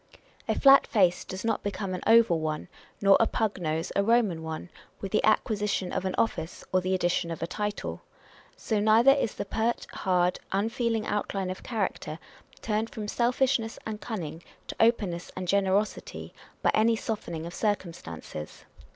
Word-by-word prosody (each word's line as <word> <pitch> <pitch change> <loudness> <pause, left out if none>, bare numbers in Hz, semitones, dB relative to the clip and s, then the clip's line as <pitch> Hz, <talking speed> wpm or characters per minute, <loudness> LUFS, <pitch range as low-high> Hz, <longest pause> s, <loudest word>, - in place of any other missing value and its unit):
A - - 0
flat 275 0 +7
face 185 -5 +3
does 190 +3 -6
not 225 -2 0
become 200 -2 -3
an 180 - -4
oval 225 -7 +6
oney 155 0 -4 0.3
nor 195 -1 +6
a 225 - +4
pug 215 -3 -1
nose 160 0 -2
a - - +4
Eoman 215 -5 +2
one, 160 +2 -6 0.3
with 195 - -5
the 215 - +2
acquisition 210 -3 +1
of 185 - -2
an 185 - -1
office, 170 -7 -1
or 185 - +4
the 185 +1 0
addition 175 -1 0
of 165 -1 -4
a - - +1
title. 205 +4 -4 0.6
So 220 -4 -1
neither 220 +5 +6
is 275 -6 0
the - - -4
pert, 225 +3 -1
hard, 180 -1 +1
unfeeling 225 +2 0
outline 195 -2 -2
of 185 - -7
character 205 -8 -3 0.5
turned 220 +1 -1
from 210 -1 -6
selfish 250 +4 +2
ness 225 0 -6
and 215 -1 -5
cunning 170 -8 -5 0.3
to - - -4
openness 205 -7 +1
and 185 -1 -4
generosity, 200 +2 0 0.3
by - - +4
any 225 +1 +4
softening 170 -8 -4
of 170 - -7
circumstances. 165 - -4
200 Hz, 170 wpm, -28 LUFS, 180-225 Hz, 0.6 s, flat